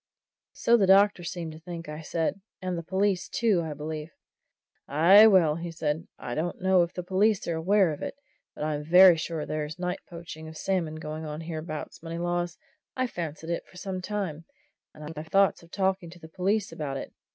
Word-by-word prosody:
"So 235 +1 +4
the 195 -4 +3
doctor 195 -1 +5
seemed 165 -1 -5
to 155 - -11
think," 170 0 -8
I 150 +1 -6
said. 165 +4 -2 0.2
"And 185 -1 -3
the 170 - -3
police, 190 +2 0
too, 215 -7 +2
I 160 -2 -4
believe." 155 +1 -5 0.8
"Aye, 185 +9 +7
well," 170 -6 +4
said 160 -3 -1
he, 165 - -13
"I 120 - -5
don't 165 +5 -2
know 185 -1 +4
if 170 0 0
the 180 - -5
police 195 +3 +2
are 170 - 0
aware 185 +2 +3
of 145 - -9
it, - - -4 0.4
but - - -5
I'm 150 -1 -1
very 180 +3 +8
sure 160 -1 -3
there's 155 0 -4
night 180 0 -2
poaching 165 -2 -9
of 160 0 -9
salmon 170 -5 -1
going 155 0 -6
on 150 0 -5
hereabouts, 160 -1 -6
Moneylaws. 175 +1 -2 0.4
I've 255 -1 0
fancied 165 -1 -5
it 170 - -3
for 185 - -16
some 185 -1 -4
time, 180 -5 -4 0.5
and 155 - -11
I've 155 +2 -7
had 155 +2 -7
thoughts 195 -1 +4
of 170 - -17
talking 190 -2 -1
to 175 +1 -13
the 160 - -12
police 195 +5 0
about 140 -3 -4
it. - - -7
170 Hz, 200 wpm, -27 LUFS, 155-190 Hz, 0.8 s, very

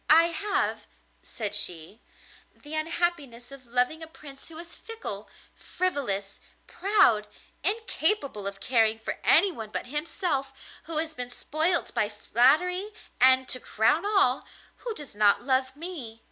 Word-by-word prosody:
'I 320 +2 +8
have,' 400 +3 -2 0.3
said 210 -3 -6
she, 190 0 +2 0.5
'the 295 +1 -10
unhappiness 310 -6 -1
of 270 -3 -13
loving 250 +7 0
a 320 - -7
Prince 285 -4 -12
who 320 - -10
is 340 +1 -9
fickle, 455 0 -8 0.2
frivolous, 240 - -3 0.3
proud, 355 - +2 0.4
incapable 330 - +2
of 200 0 -4
caring 225 -2 +2
for 225 - -6
anyone 320 - +3
but - - -5
himself, 295 -1 -2 0.3
who 330 -1 -5
has 320 0 -1
been 250 -3 -6
spoilt 320 +7 -1
by 210 - 0
flattery, 310 - +2 0.3
and, 260 0 +6
to 255 - -1
crown 250 +9 +1
all, 390 -11 +2 0.3
who 465 -3 -6
does 295 -7 -9
not 205 +1 +3
love 260 0 0
me. 290 -9 -8
280 Hz, 135 wpm, -27 LUFS, 235-340 Hz, 0.5 s, I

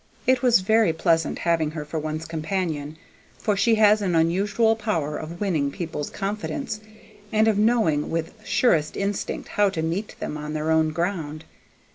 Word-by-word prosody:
It 255 -1 +3
was 245 -6 +5
very 220 -2 +3
pleasant 165 0 +1
having 165 -3 +1
her 155 -1 -6
for 155 +2 -3
one's 155 +1 -4
companion, 160 -2 -3 0.4
for 210 - 0
she 210 +3 +3
has 215 0 +5
an 185 -4 0
unusual 200 +7 +2
power 165 -10 -2
of 165 +3 -6
winning 160 -9 0
people's 155 -1 -5
confidence, 215 +4 -4 0.5
and 220 0 +3
of 215 -2 +2
knowing 210 -10 +2
with 165 0 -2
surest 205 -7 +2
instinct 200 0 -3
how 205 -1 +3
to 165 -4 -3
meet 175 +6 -3
them 150 - -4
on 150 0 -5
their 155 +1 -1
own 160 0 +3
ground. 160 -2 -3
170 Hz, 165 wpm, -24 LUFS, 155-210 Hz, 0.5 s, was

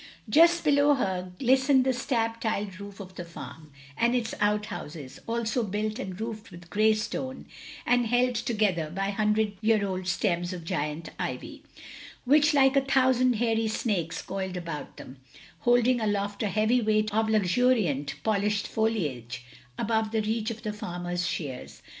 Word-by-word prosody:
Just 335 +8 +5
below 290 -1 +4
her 185 -7 -2
glistened 265 +2 +4
the 260 - +2
slab 230 -2 -1
tiled 205 -4 -2
roof 200 0 -9
of 190 -2 -9
the 180 - -6
farm, 160 -2 -10 0.2
and 235 +8 +2
its 230 -2 -1
outhouses, 205 -9 -2
also 230 +1 0
built 215 +2 -2
and 190 -7 -6
roofed 220 -1 -5
with 175 -1 -13
grey 215 +1 +4
stone, 260 +5 -4 0.4
and 245 -1 +3
held 245 +2 +2
together 210 -8 0
by 195 +4 -2
hundred 210 0 +1
year 215 -2 +3
old 185 -1 -3
stems 175 -1 0
of 175 -2 -7
giant 160 -2 -3
ivy, - - -5 0.6
which 295 +4 +5
like 270 -2 +4
a 275 - +5
thousand 260 -2 +3
hairy 225 -1 +1
snakes 190 -7 -2
coiled 190 -1 -4
about 165 -4 -6
them, 130 - -10 0.4
holding 245 0 +3
aloft 205 -1 -1
a 215 - +1
heavy 215 +4 +2
weight 215 -1 +1
of 220 +1 +1
luxuriant 205 - +2
polished 210 -1 +1
foliage 135 - -2 0.3
above 220 -1 0
the 220 -1 0
reach 220 +1 -1
of 230 -1 -7
the 210 -2 -3
farmer's 175 -3 -3
shears. 135 -6 -5
215 Hz, 155 wpm, -27 LUFS, 185-235 Hz, 0.6 s, Just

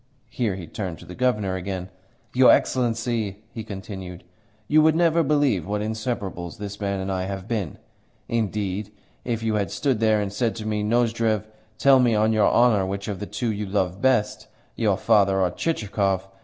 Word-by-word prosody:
Here 110 -6 -1
he 90 -3 -7
turned 90 0 -5
to - - -13
the 90 - -9
Governor 105 -5 0
again. 95 0 -5 0.4
"Your 130 0 +6
Excellency," 115 -4 0
he 110 - -6
continued, 95 -3 -8 0.4
"you 155 +1 +5
would 155 0 +4
never 170 0 +3
believe 140 - +1
what 105 +1 -1
inseperables 105 -6 -4
this 100 0 -7
man 100 -1 -1
and 95 +1 -3
I 95 -1 -1
have 95 0 -5
been. 105 -10 -3 0.5
Indeed, 105 -2 -2 0.3
if 115 -2 -2
you 110 -1 0
had 100 -2 0
stood 135 -6 0
there 110 -1 +3
and 100 -1 -3
said 115 +1 0
to 110 -2 -6
me, 105 -1 -1
'Nozdrev, 115 -1 +1 0.3
tell 135 +2 +5
me 120 -3 +3
on 110 +1 +3
your 105 -2 +4
honour 115 -5 +4
which 100 +1 -4
of 100 -4 -4
the 105 - -5
two 120 -3 -2
you 105 -1 -4
love 95 -1 -1
best 125 -5 +1 0.3
your 105 -4 +1
father 100 -3 +3
or 90 -2 +2
Chichikov? 100 - -1
105 Hz, 185 wpm, -24 LUFS, 95-115 Hz, 0.5 s, Your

